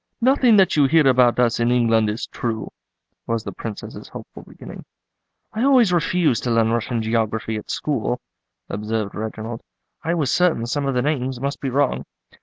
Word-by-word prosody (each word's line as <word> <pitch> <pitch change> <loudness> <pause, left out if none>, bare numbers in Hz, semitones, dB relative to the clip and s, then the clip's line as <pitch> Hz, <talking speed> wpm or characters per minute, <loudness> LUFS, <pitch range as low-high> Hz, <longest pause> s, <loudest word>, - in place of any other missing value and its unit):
"Nothing 250 -2 +4
that 190 -2 +4
you 145 -2 +4
hear 155 0 +4
about 125 -2 +4
us 120 -2 +2
in 120 0 +2
England 115 -3 +3
is 105 +2 -3
true," 110 -2 -4 0.6
was 115 -1 -1
the - - -5
Princess's 110 -3 -8
hopeful - - -11
beginning. - - -11 0.7
"I 220 - -1
always 255 -8 +4
refused 170 -5 +1
to - - 0
learn 115 -1 +2
Russian 115 0 -1
geography 110 0 -1
at 105 - -9
school," 125 -4 -2 0.5
observed 105 0 -3
Reginald; 110 +2 -5 0.4
"I 165 +3 0
was 150 -6 0
certain 175 -10 +2
some 140 +4 -2
of 135 - -1
the 125 - +1
names 135 -4 -1
must 140 +2 -3
be 135 - -2
wrong." 140 +3 0
125 Hz, 175 wpm, -21 LUFS, 115-150 Hz, 0.7 s, Nothing